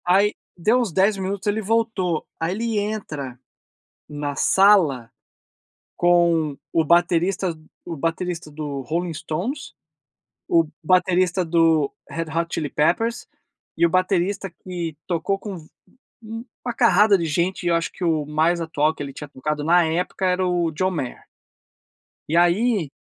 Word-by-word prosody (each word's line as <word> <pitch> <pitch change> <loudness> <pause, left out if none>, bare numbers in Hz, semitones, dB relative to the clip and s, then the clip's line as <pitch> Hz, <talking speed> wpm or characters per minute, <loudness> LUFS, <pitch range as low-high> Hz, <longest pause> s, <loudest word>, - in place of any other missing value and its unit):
Aí 195 +4 +4 0.2
deu 215 +8 +3
uns 235 -7 -1
10 195 +4 +2
minutos 195 +1 -3
ele 210 +2 +1
voltou. 210 -6 0
Ai 165 +2 -1
ele 225 +1 -1
entra 155 - -4 0.7
na 145 -1 -4
sala 165 - +4 0.9
com 170 -4 +3 0.2
o 165 - +2
baterista 175 +2 +2 0.3
o 170 - -5
baterista 165 +1 -3
do 145 -2 -5
Rolling 170 +6 -2
Stones, 175 - -4 1.1
baterista 180 +1 +2
do 165 -3 +3 0.2
Red 165 - -3
Hot 170 0 +1
Chili 155 -3 -2
Peppers 225 +10 0 0.5
e 170 - +4
o - - -1
baterista 185 +1 0
que 170 -2 -6
tocou 185 +3 -1
com 190 -7 -8 1.0
uma 245 - -3
carrada 210 -3 +5
de 170 - -2
gente 170 +5 -1
e 175 - +1
eu 170 - +3
acho 165 0 -1
que - - -8
o 160 -3 +1
mais 160 +3 +1
atual 155 -1 +1
que - - -10
ele 140 -1 -7
tinha 150 - -8
tocado 150 +2 -3
na 170 +2 +4
época 175 +4 -1
era 185 0 +1
o 175 -2 +1
John 185 +5 0
Mayer. 140 -8 -5 1.0
E 165 - +2
aí 175 - +3
175 Hz, 145 wpm, -22 LUFS, 160-190 Hz, 1.1 s, carrada